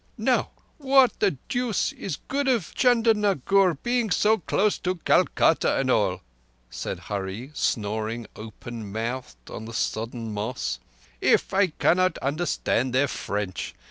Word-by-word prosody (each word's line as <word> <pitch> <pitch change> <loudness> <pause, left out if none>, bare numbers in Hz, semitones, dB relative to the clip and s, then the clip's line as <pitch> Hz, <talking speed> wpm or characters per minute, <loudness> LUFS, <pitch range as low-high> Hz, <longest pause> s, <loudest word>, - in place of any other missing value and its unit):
"Now - - +1 0.3
what 270 -2 +4
the 195 -9 +2
deuce 245 -4 0
is 170 -7 -5
good 280 0 -1
of 235 -10 +1
Chandernagore 205 - +3
being 240 -2 +1
so 215 +3 +3
close 200 +4 +1
to 185 0 -1
Calcutta 170 - +2
and - - +1
all," - - +1 0.5
said - - -5
Hurree, 100 +6 -5
snoring 110 -2 -2
open 110 0 -8
mouthed 110 - -5
on 110 - -7
the 115 - -8
sodden 115 0 -3
moss, 105 +4 -3 0.4
"if - - +3
I 195 0 +4
cannot 185 +2 +2
understand 140 -4 -1
their 140 +2 +3
French? 100 -7 -4
145 Hz, 130 wpm, -25 LUFS, -, 0.5 s, what